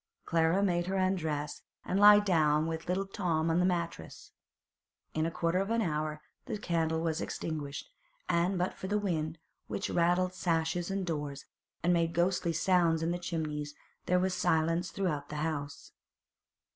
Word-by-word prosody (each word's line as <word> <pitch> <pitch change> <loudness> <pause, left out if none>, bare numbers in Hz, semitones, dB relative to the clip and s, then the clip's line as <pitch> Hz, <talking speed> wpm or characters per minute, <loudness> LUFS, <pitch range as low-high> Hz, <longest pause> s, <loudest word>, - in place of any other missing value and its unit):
Clara 165 +4 +2
made 175 -2 +1
her 190 - -1
undress 160 -6 -1 0.2
and 190 - 0
lie 205 0 +9
down 155 -6 +2
with 165 0 -4
little 185 +2 0
Tom 165 -5 0
on 165 - +2
the 180 - +3
mattress. 170 - -4 0.8
In 155 +1 0
a - - -3
quarter 170 +1 0
of 195 +2 -1
an 230 0 +2
hour 155 -2 -2 0.2
the - - -2
candle 165 -4 0
was 165 -1 -1
extinguished, 150 -3 -4 0.4
and 175 +3 +1
but 180 +1 0
for 190 - -7
the 205 +2 +1
wind, 165 -6 -2 0.3
which - - -3
rattled 180 +2 +2
sashes 170 0 0
and 195 -1 -2
doors, 145 -4 -4 0.4
and 175 +1 +4
made 165 -1 +1
ghostly 175 0 +1
sounds 165 -1 +2
in 165 - 0
the 175 - -2
chimneys, 150 -4 -3 0.3
there 180 - +3
was 185 +1 +1
silence 165 +1 +1
throughout 155 -7 -2
the - - -6
house. 145 -3 -5
170 Hz, 165 wpm, -31 LUFS, 160-185 Hz, 0.8 s, lie